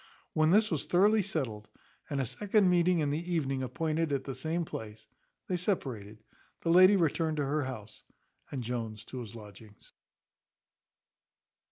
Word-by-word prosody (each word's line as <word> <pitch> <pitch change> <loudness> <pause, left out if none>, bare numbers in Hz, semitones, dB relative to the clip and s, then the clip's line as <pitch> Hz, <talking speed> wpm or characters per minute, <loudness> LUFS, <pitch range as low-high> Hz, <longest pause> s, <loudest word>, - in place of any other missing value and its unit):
When 155 0 +3
this 210 +4 +4
was 155 -4 -1
thoroughly 205 +4 +4
settled, 130 - -4 0.4
and 140 - -1
a 135 - +1
second 200 - +2
meeting 175 -1 +3
in 145 -1 0
the 170 +4 -3
evening 135 -5 0
appointed 160 +3 -1
at 135 -2 0
the 135 - -5
same 160 +6 -2
place, 110 -5 -8 0.4
they 180 - -1
separated; 115 - -3 0.4
the 165 - +1
lady 185 +3 +8
returned 160 -2 +1
to 145 - 0
her 145 +1 0
house, 110 -5 -8 0.5
and 130 -3 -4
Jones 115 -2 -4
to 130 - -7
his 115 -2 -8
lodgings. 105 -1 -14
145 Hz, 155 wpm, -31 LUFS, 120-175 Hz, 0.5 s, lady